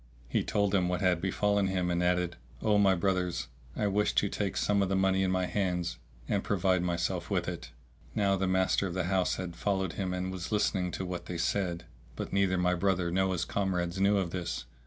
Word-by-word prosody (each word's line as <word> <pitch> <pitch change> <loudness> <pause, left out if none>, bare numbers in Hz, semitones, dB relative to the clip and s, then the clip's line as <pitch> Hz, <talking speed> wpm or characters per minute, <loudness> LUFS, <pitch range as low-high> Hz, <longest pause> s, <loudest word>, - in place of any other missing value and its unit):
He - - 0
told 100 -1 +1
them 90 -3 +2
what 90 0 -1
had 90 -3 +2
befallen 100 +1 +1
him 90 -2 0
and 85 0 +1
added, 90 0 +1 0.3
"O 105 -1 +4
my 95 -2 +5
brothers, 90 -1 -1 0.3
I 105 - 0
wish 105 +1 +1
to 100 - +3
take 100 -1 -2
some 100 -1 +2
of 95 - +1
the 95 - +1
money 95 0 +2
in 95 - +2
my 95 0 +1
hands 90 -3 -1 0.3
and 100 -1 0
provide 95 -2 +2
myself 85 -1 -1
with - - 0
it." - - -5 0.5
Now 100 -2 +3
the 95 0 0
master 95 +1 +2
of 90 - -5
the 95 - 0
house 95 0 +1
had 90 -2 -5
followed 95 -4 -1
him 95 -2 -2
and 90 0 -2
was 90 0 -5
listening 100 -3 +1
to 95 - -3
what 90 -1 -5
they 90 - -4
said; 85 0 -1 0.3
but - - -5
neither 95 -2 +2
my 90 0 +2
brother 90 -1 +1
nor 95 +1 +2
his 85 -2 -1
comrades 90 -2 -1
knew 100 +1 +4
of 90 -3 -1
this. 85 -2 -3
95 Hz, 220 wpm, -30 LUFS, 90-100 Hz, 0.5 s, my